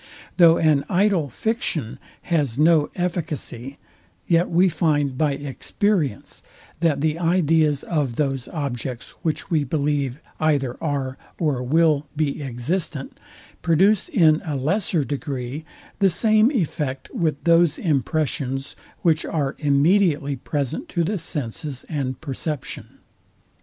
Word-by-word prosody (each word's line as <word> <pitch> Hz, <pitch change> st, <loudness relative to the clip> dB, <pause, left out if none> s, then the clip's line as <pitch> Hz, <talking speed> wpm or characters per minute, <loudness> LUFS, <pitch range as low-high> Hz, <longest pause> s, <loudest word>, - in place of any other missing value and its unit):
Though 170 Hz, -2 st, +7 dB
an 150 Hz, -3 st, +3 dB
idle 185 Hz, -5 st, +2 dB
fiction 165 Hz, -, -2 dB, 0.2 s
has 145 Hz, -9 st, 0 dB
no 155 Hz, 0 st, +4 dB
efficacy, 155 Hz, -7 st, -4 dB, 0.5 s
yet 170 Hz, 0 st, +2 dB
we 180 Hz, +3 st, +4 dB
find 145 Hz, -6 st, +1 dB
by 150 Hz, +1 st, +1 dB
experience, 145 Hz, -, -2 dB, 0.4 s
that 155 Hz, -4 st, +1 dB
the 155 Hz, +1 st, 0 dB
ideas 160 Hz, -4 st, +2 dB
of 145 Hz, -8 st, -1 dB
those 135 Hz, -3 st, -1 dB
objects, 130 Hz, -5 st, -4 dB
which 160 Hz, +3 st, -3 dB
we 155 Hz, -3 st, +2 dB
believe 140 Hz, -1 st, -1 dB, 0.2 s
either 140 Hz, -5 st, +1 dB
are 140 Hz, -4 st, -2 dB, 0.2 s
or 150 Hz, -6 st, 0 dB
will 150 Hz, +2 st, +2 dB
be 150 Hz, -1 st, -1 dB
existent, 140 Hz, +3 st, -3 dB, 0.4 s
produce 190 Hz, +6 st, +3 dB
in 155 Hz, -3 st, +4 dB
a 155 Hz, -4 st, -3 dB
lesser 160 Hz, +3 st, +1 dB
degree 140 Hz, +1 st, -4 dB, 0.3 s
the 195 Hz, -2 st, +5 dB
same 215 Hz, +5 st, +4 dB
effect 150 Hz, -, -2 dB
with 155 Hz, -4 st, -1 dB
those 170 Hz, -2 st, +4 dB
impressions, 140 Hz, -3 st, -1 dB, 0.3 s
which 165 Hz, -2 st, +3 dB
are 145 Hz, -3 st, -2 dB
immediately 145 Hz, 0 st, +2 dB
present 145 Hz, -, -3 dB
to 170 Hz, -, 0 dB
the 195 Hz, +4 st, -1 dB
senses 145 Hz, -4 st, -4 dB
and 130 Hz, -4 st, -3 dB
perception. 150 Hz, 0 st, -5 dB
150 Hz, 120 wpm, -23 LUFS, 140-170 Hz, 0.5 s, Though